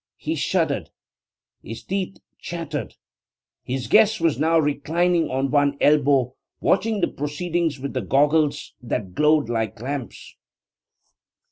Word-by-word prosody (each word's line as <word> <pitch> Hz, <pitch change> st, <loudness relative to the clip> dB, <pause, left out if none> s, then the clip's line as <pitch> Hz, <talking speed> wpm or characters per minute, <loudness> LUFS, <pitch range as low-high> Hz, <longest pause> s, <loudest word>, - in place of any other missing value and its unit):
He -, -, -3 dB
shuddered; -, -, -1 dB, 0.7 s
his 115 Hz, 0 st, -8 dB
teeth 195 Hz, -, -3 dB, 0.2 s
chattered. 160 Hz, -7 st, -5 dB, 0.7 s
His 130 Hz, 0 st, -3 dB
guest 220 Hz, 0 st, +4 dB
was 165 Hz, -4 st, +1 dB
now 165 Hz, +2 st, +3 dB
reclining 160 Hz, +3 st, +1 dB
on 135 Hz, +1 st, -1 dB
one 145 Hz, -1 st, +2 dB
elbow, 140 Hz, -4 st, +3 dB, 0.3 s
watching 215 Hz, +1 st, +1 dB
the -, -, +3 dB
proceedings 160 Hz, +1 st, -2 dB
with 140 Hz, +1 st, -5 dB
the 130 Hz, -, -1 dB
goggles 145 Hz, +7 st, +1 dB
that 110 Hz, -6 st, -4 dB
glowed 150 Hz, -1 st, +3 dB
like 110 Hz, -2 st, -2 dB
lamps. 130 Hz, 0 st, -6 dB
145 Hz, 120 wpm, -23 LUFS, 130-165 Hz, 0.7 s, guest